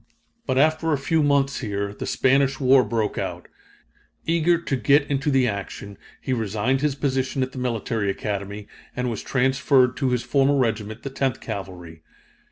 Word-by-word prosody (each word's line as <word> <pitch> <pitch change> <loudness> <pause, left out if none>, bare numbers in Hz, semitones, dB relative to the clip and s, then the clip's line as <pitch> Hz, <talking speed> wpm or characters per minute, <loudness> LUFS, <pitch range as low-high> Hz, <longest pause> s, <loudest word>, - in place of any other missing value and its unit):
But 130 - 0
after 155 +3 +2
a - - +2
few 160 +4 +1
months 140 -1 +2
here, 100 -3 -3
the - - -6
Spanish 135 0 +2
War 130 -1 +5
broke 110 -3 -1
out. - - -5 0.8
Eager 170 +1 +2
to 155 -5 -2
get 140 +4 +3
into 135 +1 0
the 135 -3 +3
action, 100 -1 -5 0.2
he 130 - -2
resigned 110 +3 0
his 150 -2 0
position 135 -1 -1
at 130 - -4
the 130 - -7
Military 115 -4 -1
Academy, 100 +1 -4 0.3
and 125 -1 -1
was 110 - -4
transferred 130 -1 +2
to 130 - 0
his 125 -1 0
former 140 0 +2
regiment, 110 -3 -1
the 135 - -5
Tenth 135 -2 -1
Cavalry. 90 -4 -7
130 Hz, 170 wpm, -23 LUFS, 110-140 Hz, 0.8 s, War